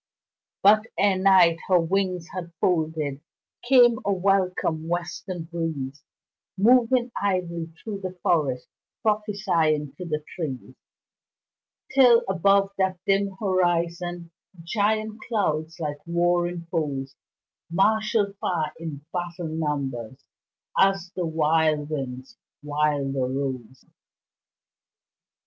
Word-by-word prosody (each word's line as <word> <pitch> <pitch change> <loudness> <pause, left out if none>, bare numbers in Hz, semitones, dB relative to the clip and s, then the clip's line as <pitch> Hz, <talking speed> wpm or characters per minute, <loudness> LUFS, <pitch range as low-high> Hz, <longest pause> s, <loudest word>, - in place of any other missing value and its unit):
But 215 +2 +6
e'er 200 -1 +4
Night 185 -3 +5
her 185 -2 +5
wings 180 0 -1
had 175 -2 -6
folded 155 -5 0 0.4
Came 240 -2 +5
a 200 - 0
welcome 185 -4 0
western 175 +1 -4
breeze, 160 -5 -4 0.5
Moving 245 +3 +4
idly 175 -4 -1 0.2
through 205 -3 -5
the 185 -1 -6
forest, 140 -7 +1 0.4
Prophesying 190 -9 0
to 180 - -6
the 155 -2 -3
trees, 135 -7 -5 1.2
Till 250 -3 +6
above 195 +1 +3
that 190 -1 +1
dim 195 0 +2
horizon 175 -2 0 0.3
Giant 215 +3 -1
clouds 165 -7 -1
like 150 -2 -3
warring 175 0 0
foes 140 -5 -2 0.5
Marshalled 210 +2 +2
far 165 -5 -2
in 150 -3 -7
battle 175 -2 -4
numbers 140 -6 -3 0.6
As 195 -2 +3
the 180 -2 -1
wild 155 -1 +1
winds 130 -3 -5 0.2
wilder 145 -3 0
rose. 130 -2 -4
175 Hz, 100 wpm, -25 LUFS, 155-195 Hz, 1.2 s, But